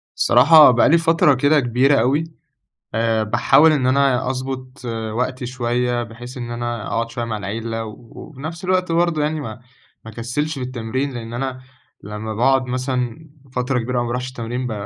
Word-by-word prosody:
الصراحة 155 Hz, -2 st, +7 dB
بقى 120 Hz, -, +4 dB
لي 165 Hz, -, +6 dB
فترة 165 Hz, -3 st, +3 dB
كده 145 Hz, +4 st, +3 dB
كبيرة 130 Hz, +2 st, +2 dB
أوي، 135 Hz, +7 st, +2 dB, 0.7 s
آآ، 115 Hz, -1 st, +1 dB
باحاول 150 Hz, +8 st, +4 dB
إن 135 Hz, -4 st, +1 dB
أنا 130 Hz, -1 st, +2 dB
أضبط 130 Hz, 0 st, -6 dB, 0.3 s
وقتي 125 Hz, +2 st, -2 dB
شوية، 120 Hz, 0 st, -1 dB
بحيث 120 Hz, +2 st, -10 dB
إن 120 Hz, -2 st, -6 dB
أنا 120 Hz, -2 st, -4 dB
أقعد 115 Hz, 0 st, -2 dB
شوية 120 Hz, 0 st, -4 dB
مع 115 Hz, -2 st, -3 dB
العِيلة 115 Hz, +2 st, -4 dB
و 110 Hz, -, -7 dB
وفي 130 Hz, +5 st, -13 dB
نفْس 165 Hz, +4 st, -6 dB
الوقت 185 Hz, -1 st, +1 dB
برضو 170 Hz, -2 st, +1 dB
يعني 150 Hz, +1 st, -1 dB
ما 110 Hz, -4 st, -7 dB, 0.4 s
ما 110 Hz, -, -9 dB
أكسلش 125 Hz, +7 st, -3 dB
في 130 Hz, -, -3 dB
التمرين، 130 Hz, +2 st, -3 dB
لأن 115 Hz, -1 st, -7 dB
أنا 130 Hz, +1 st, -4 dB, 0.4 s
لمّا 105 Hz, +1 st, -6 dB
باقعد 130 Hz, +3 st, +2 dB
مثلًا 130 Hz, +3 st, -3 dB, 0.3 s
فترة 125 Hz, +1 st, 0 dB
كبيرة 125 Hz, +1 st, -1 dB
ما 120 Hz, -, -2 dB
بارُوحش 125 Hz, +2 st, -3 dB
التمرين 125 Hz, 0 st, -4 dB
ب 120 Hz, -, -3 dB
125 Hz, 175 wpm, -20 LUFS, 115-140 Hz, 0.7 s, الصراحة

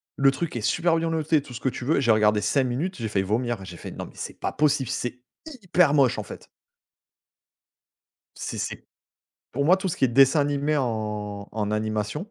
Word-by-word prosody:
Le 135 Hz, 0 st, +4 dB
truc 165 Hz, +1 st, -4 dB
est 120 Hz, -, -2 dB
super 165 Hz, +8 st, +2 dB
bien 165 Hz, 0 st, 0 dB
noté, 160 Hz, -1 st, +1 dB
tout 135 Hz, -, -12 dB
ce 120 Hz, -, -6 dB
que 130 Hz, -, 0 dB
tu 120 Hz, -, -7 dB
veux 155 Hz, -, +2 dB
et -, -, +2 dB
j'ai 120 Hz, -4 st, +4 dB
regardé 105 Hz, -1 st, +4 dB
5 135 Hz, +7 st, +2 dB
minutes, 135 Hz, +10 st, -2 dB
j'ai 115 Hz, -3 st, -3 dB
failli 95 Hz, -2 st, 0 dB
vomir. 115 Hz, +1 st, -1 dB
J'ai 90 Hz, -2 st, -9 dB
fait: -, -, -8 dB
«Non, -, -, -6 dB
mais -, -, -14 dB
c'est -, -, -7 dB
pas -, -, -2 dB
possible, 145 Hz, -3 st, +1 dB
c'est 125 Hz, 0 st, -3 dB, 0.4 s
hyper 180 Hz, -5 st, +3 dB
moche, 135 Hz, -5 st, +4 dB
en -, -, -3 dB
fait» -, -, -11 dB, 1.9 s
c'est -, -, -5 dB
c'est -, -, -5 dB, 0.7 s
pour 140 Hz, -, 0 dB
moi, 175 Hz, +5 st, +6 dB
tout 190 Hz, 0 st, -3 dB
ce 170 Hz, -, -3 dB
qui -, -, +2 dB
est 130 Hz, -, +4 dB
dessin 135 Hz, +4 st, +5 dB
animé 145 Hz, +1 st, 0 dB
en 105 Hz, -5 st, -3 dB
en 105 Hz, -1 st, -2 dB
animation, 110 Hz, -, -2 dB
130 Hz, 215 wpm, -25 LUFS, 110-150 Hz, 1.9 s, moi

